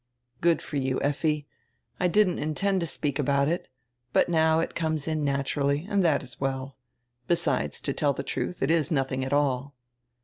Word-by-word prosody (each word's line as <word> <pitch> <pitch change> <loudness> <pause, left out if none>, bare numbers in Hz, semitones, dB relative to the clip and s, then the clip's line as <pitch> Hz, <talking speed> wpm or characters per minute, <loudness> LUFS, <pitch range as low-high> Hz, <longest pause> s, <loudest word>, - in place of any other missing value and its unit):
"Good 170 -1 +3
for 145 - -4
you, 130 -1 0
Effi. 145 +1 0 0.5
I 180 - +3
didn't 185 -1 +3
intend 190 +6 0
to 170 - -1
speak 145 -3 -1
about 140 0 +2
it. 170 +3 -1 0.5
But - - +3
now 160 -1 +3
it 165 - -2
comes 160 -3 -1
in 155 -1 -1
naturally, 140 +2 0
and 200 -2 +2
that 155 -5 +2
is 125 0 -10
well. 135 0 -2 0.5
Besides, 170 0 +1
to 140 - -1
tell 145 0 +2
the 135 - -4
truth, 170 +5 -3
it - - +2
is 160 -4 +2
nothing 135 -3 0
at 130 - -4
all." 140 -1 0
145 Hz, 180 wpm, -27 LUFS, 140-165 Hz, 0.5 s, Good